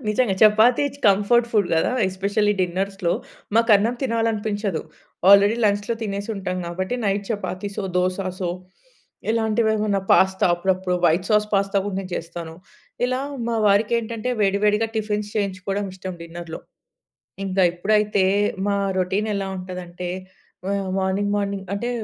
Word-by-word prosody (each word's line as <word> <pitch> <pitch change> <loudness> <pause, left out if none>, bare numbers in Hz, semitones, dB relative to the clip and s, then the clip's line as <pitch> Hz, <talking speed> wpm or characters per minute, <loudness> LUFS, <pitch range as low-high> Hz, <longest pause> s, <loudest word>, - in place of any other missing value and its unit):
నిజంగా 215 -1 +2
చపాతీ 220 +5 +5
చ్ - - -14
comfort 210 +4 +4
food 205 -5 +2
గదా! 160 - +1 0.2
ఎస్పెషల్లీ 200 +2 0
డిన్నర్స్‌లో 185 0 -1 0.4
మాకు 230 +1 +3
అన్నం 220 +5 0
తినాలనిపించదు. 220 -6 -1 0.5
ఆల్రెడీ 200 +2 +6
లంచ్‌లో 205 +2 +1
తినేసి 200 -1 -4
ఉంటాం 185 -2 -3
గాబట్టి, 185 +6 -3
నైట్ 200 0 0
చపాతీసో, 205 -1 -4
దోసాసో 185 0 -1 0.8
ఇలాంటివేమన్నా 220 -2 +1
పాస్తా 190 0 +4
అప్పుడప్పుడు 185 +1 0
వైట్ 175 +3 +3
సాస్, 210 0 +3
పాస్తా 200 0 +2
గూడా 200 -2 -3
నేను 185 -1 -8
చేస్తాను. 165 -1 -6 0.5
ఇలా 255 +1 -1 0.3
మా 230 - 0
వారికేంటంటే 225 +3 +1
వేడి, 200 -1 +2
వేడిగా 210 +2 +2
టిఫిన్స్ 210 -1 -2
చేయించుకోవడం 195 0 -2
ఇష్టం 185 0 -6
డిన్నర్‌లో. 170 0 -8 0.9
ఇంగా 190 0 +2
ఇప్పుడైతే 210 +1 +2 0.4
మా 200 0 +1 0.2
రొటీన్ 195 +4 0
ఎలా 195 -1 -2
ఉంటదంటే 180 -1 -6 0.6
ఆహ్, 200 -1 -1
మార్నింగ్, 190 +2 0
మార్నింగ్ 200 -1 -3
అంటే 235 +4 -2
200 Hz, 130 wpm, -22 LUFS, 185-215 Hz, 0.9 s, ఆల్రెడీ